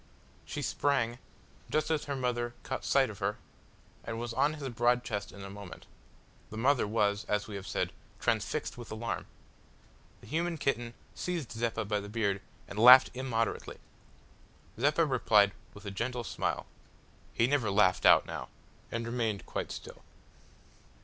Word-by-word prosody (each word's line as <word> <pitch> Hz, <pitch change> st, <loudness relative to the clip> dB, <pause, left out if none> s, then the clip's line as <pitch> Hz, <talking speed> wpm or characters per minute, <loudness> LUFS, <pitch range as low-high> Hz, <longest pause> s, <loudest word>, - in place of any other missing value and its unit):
She -, -, -4 dB
sprang, 120 Hz, -4 st, +1 dB, 0.5 s
just 155 Hz, +2 st, +1 dB
as 155 Hz, -2 st, 0 dB
her 140 Hz, -, -2 dB
mother 120 Hz, -2 st, -1 dB
caught 130 Hz, -, -4 dB
sight 135 Hz, -4 st, +3 dB
of 100 Hz, -, -12 dB
her, 100 Hz, +1 st, -1 dB, 0.7 s
and 115 Hz, -, -4 dB
was 120 Hz, 0 st, -4 dB
on 145 Hz, +5 st, +2 dB
his 145 Hz, -3 st, -5 dB
broad 120 Hz, +1 st, +2 dB
chest 105 Hz, -4 st, -4 dB
in 100 Hz, -, -10 dB
a 95 Hz, -, -7 dB
moment. 100 Hz, -3 st, -10 dB, 0.6 s
The 110 Hz, -, -8 dB
mother 130 Hz, 0 st, +3 dB
was, 105 Hz, -1 st, +1 dB
as 105 Hz, 0 st, 0 dB
we 105 Hz, -, -8 dB
have 100 Hz, -1 st, -6 dB
said, -, -, -1 dB, 0.3 s
transfixed -, -, -1 dB
with 120 Hz, -, -8 dB
alarm. 110 Hz, +2 st, -3 dB, 0.9 s
The -, -, -14 dB
human 170 Hz, +2 st, -1 dB
kitten 120 Hz, -5 st, -1 dB, 0.2 s
seized 170 Hz, -9 st, -3 dB
Zeppa 115 Hz, -1 st, -1 dB
by 105 Hz, 0 st, 0 dB
the 100 Hz, 0 st, -8 dB
beard 100 Hz, -3 st, 0 dB, 0.3 s
and 100 Hz, -, -6 dB
laughed 125 Hz, +3 st, +10 dB
immoderately. 125 Hz, -3 st, -2 dB, 1.0 s
Zeppa 150 Hz, +5 st, +3 dB
replied 110 Hz, -7 st, +4 dB, 0.2 s
with 105 Hz, -, -12 dB
a 100 Hz, -, -4 dB
gentle 120 Hz, +4 st, -2 dB
smile -, -, -2 dB, 0.7 s
he 115 Hz, -, +2 dB
never 130 Hz, -4 st, +1 dB
laughed 100 Hz, -3 st, +3 dB
out -, -, +7 dB
now -, -, -6 dB, 0.4 s
and 115 Hz, 0 st, -2 dB
remained 115 Hz, -4 st, -1 dB
quite -, -, -4 dB
still. -, -, -8 dB
115 Hz, 155 wpm, -31 LUFS, 105-130 Hz, 1.0 s, laughed